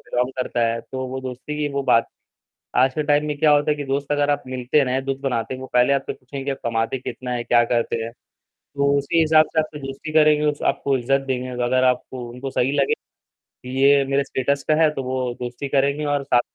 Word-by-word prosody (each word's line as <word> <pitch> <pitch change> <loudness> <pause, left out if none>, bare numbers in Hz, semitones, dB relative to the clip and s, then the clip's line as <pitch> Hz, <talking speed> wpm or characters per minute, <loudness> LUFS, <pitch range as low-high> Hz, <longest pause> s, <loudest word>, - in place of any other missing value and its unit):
Belong 125 +2 0
करता 125 -1 -1
है, 115 0 -1
तो 130 +1 -6
वो 130 +1 -5
दोस्ती 130 +3 -6
की 150 -1 0
वो 140 - 0
बात 120 -3 +3 0.7
आज 130 0 +4
के 155 - 0
टाइम 145 0 +2
में 150 -1 -2
क्या 155 +1 +4
होता 145 +1 +3
है 150 - +1
कि 145 - -4
दोस्त 140 +2 -2
अगर 145 0 +2
आप 145 - 0
मिलते 130 +2 0
हैं 140 - +4
ना, 125 - -1
या 130 - +1
दोस्त 135 0 -4
बनाते 125 -2 -1
हैं, 130 - -8
वो 130 - -7
पहले 125 +3 +4
आपसे 135 -1 -1
पूछेंगे 135 +2 -6
आप 135 - -3
कमाते 115 +2 -1
कितना 125 0 -6
हैं? 120 -1 -2
क्या 120 0 +4
करते 115 -1 0
हैं? 115 - -5 0.5
तो 140 0 -3
उसी 165 +4 +1
हिसाब 155 0 +5
से - - +1
आपसे 155 -1 -6
दोस्ती 140 +3 -7
करेंगे, 150 -1 +4
उस 145 -1 -1
आपको 140 -1 -1
इज़्ज़त 135 +3 +1
देंगे, 130 -1 -2 0.2
अगर 130 +1 +2
आपको 125 0 -1
उनको 125 +3 -6
सही 130 +1 0
लगे, 140 - +3 0.9
ये 140 0 +5
मेरे 135 +1 0
स्टेटस 140 +1 -1
का - - +6
है, 155 - +6
तो 135 -3 -4
वो 130 -1 -2
दोस्ती 125 +3 -5
करेंगे 140 +2 +1
और 145 -1 0
साथ 120 - +3
135 Hz, 235 wpm, -22 LUFS, 125-145 Hz, 0.9 s, का